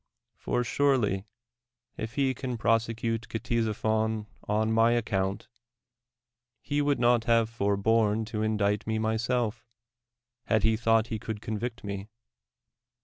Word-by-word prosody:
For 125 - -1
surely, 120 -7 +1 0.7
if 110 +1 -6
he 135 -2 +2
can 125 -1 -4
prosecute 115 0 0
Ctesiphon 110 -1 -1 0.2
on 110 +1 +1
my 115 +1 +4
account, 100 -3 -1 1.2
he 145 0 0
would 145 -2 +1
not 120 -1 +3
have 115 -1 +3
forborne 110 +1 +1
to 110 -2 -3
indict 105 -1 0
me 110 0 0
myself, 110 +1 -1 0.8
had 110 -2 +2
he 110 0 +4
thought 115 0 +2
he 110 - -3
could 110 0 -5
convict 110 +2 -4
me. 100 0 -5
110 Hz, 120 wpm, -28 LUFS, 110-115 Hz, 1.2 s, my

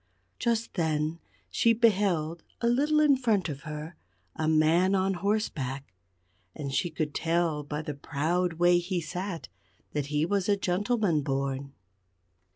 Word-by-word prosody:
Just 230 -1 0
then 160 -1 0 0.3
she 230 - +4
beheld, 190 -8 +2 0.2
a - - -2
little 290 +6 +3
in 300 -2 +5
front 225 -9 +1
of 140 -2 -5
her, 150 +2 -6 0.4
a 160 -1 -1
man 160 +5 +4
on 190 0 +1
horseback. 160 - -2 0.6
And 140 -3 -5
she 175 +6 +1
could 155 -2 -3
tell 165 -2 0
by 150 +1 -4
the 150 -2 -4
proud 160 +5 -1
way 175 +1 +4
he 180 +1 -2
sat 175 +2 -5 0.5
that 145 -2 -1
he 150 +1 +1
was 200 +2 0
a 200 - +4
gentleman 195 -2 +1
born. 135 0 -2
170 Hz, 145 wpm, -28 LUFS, 150-200 Hz, 0.6 s, in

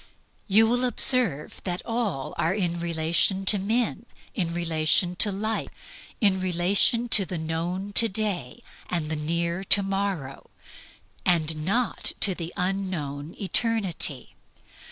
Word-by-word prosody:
You 215 +2 +5
will 245 +2 0
observe 240 - +1
that 180 -1 -4
all 225 - -3
are 170 +4 0
in 175 -4 -2
relation 170 +3 0
to 205 +1 +5
men, 230 +3 -1 0.3
in 175 -6 -2
relation 170 +1 0
to 205 - +3
life, 215 +3 -3 0.5
in 195 -3 +2
relation 185 +6 +1
to 205 - +9
the 180 -1 -5
known 170 +5 -4
to 230 +3 +4
day 190 - -3 0.3
and 165 -4 -2
the - - -1
near 170 +4 -2
to 200 - +4
morrow, 195 -8 -4 0.7
and 160 -3 +1
not 235 +4 +1
to 195 - +4
the 170 -1 -6
unknown 180 -6 -3
eternity. 195 - +1
185 Hz, 130 wpm, -25 LUFS, 165-205 Hz, 0.7 s, to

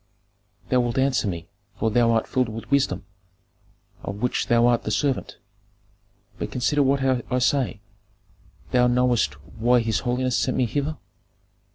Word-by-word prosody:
"Thou 125 - +3
wilt 120 0 -1
answer 130 -4 +2
me, 85 -3 -4 0.3
for 110 - 0
thou 120 +1 +3
art 115 -1 +2
filled 130 -3 0
with 115 +4 -8
wisdom, 130 -10 +1 1.0
of 100 - -5
which 125 +4 -1
thou 120 -1 +4
art 120 -1 +3
the - - -4
servant. 130 +5 -1 1.0
But - - -4
consider 145 +4 +1
what 135 0 +2
I 125 -1 0
say 125 -4 +1 0.9
Thou 125 -1 +4
knowest 120 - +2
why 120 - +1
his 115 -1 0
holiness 125 0 -1
sent 130 - 0
me 130 - +3
hither." 145 +6 -2
125 Hz, 150 wpm, -24 LUFS, 115-130 Hz, 1.0 s, thou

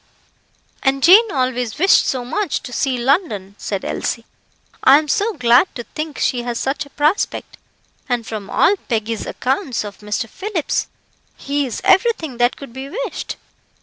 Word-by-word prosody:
"And 270 0 +1
Jane 410 +5 +7
always 255 -3 -1
wished 375 +5 +4
so 255 -2 -1
much 400 +7 -2
to 250 -2 -8
see 265 -1 0
London," 240 - 0
said 195 -2 -4
Elsie. 230 -1 -3 0.6
"I 270 +2 +8
am 305 0 -1
so 410 +10 +1
glad 250 +1 +4
to 240 - -5
think 305 +3 -6
she 245 - 0
has 240 -1 -3
such 285 +2 -2
a - - -19
prospect, 300 +7 -1 0.5
and 240 -2 0
from 215 -3 -6
all 395 - +4
Peggy's 225 -1 -2
accounts 265 - -1
of 205 -1 -9
Mr. 210 +3 -3
Phillips, 380 - -2 0.5
he 285 0 -1
is 235 - -5
everything 370 - +2
that 245 +1 +2
could 275 -5 -10
be 265 +2 -7
wished. - - -4
265 Hz, 160 wpm, -19 LUFS, 240-315 Hz, 0.6 s, I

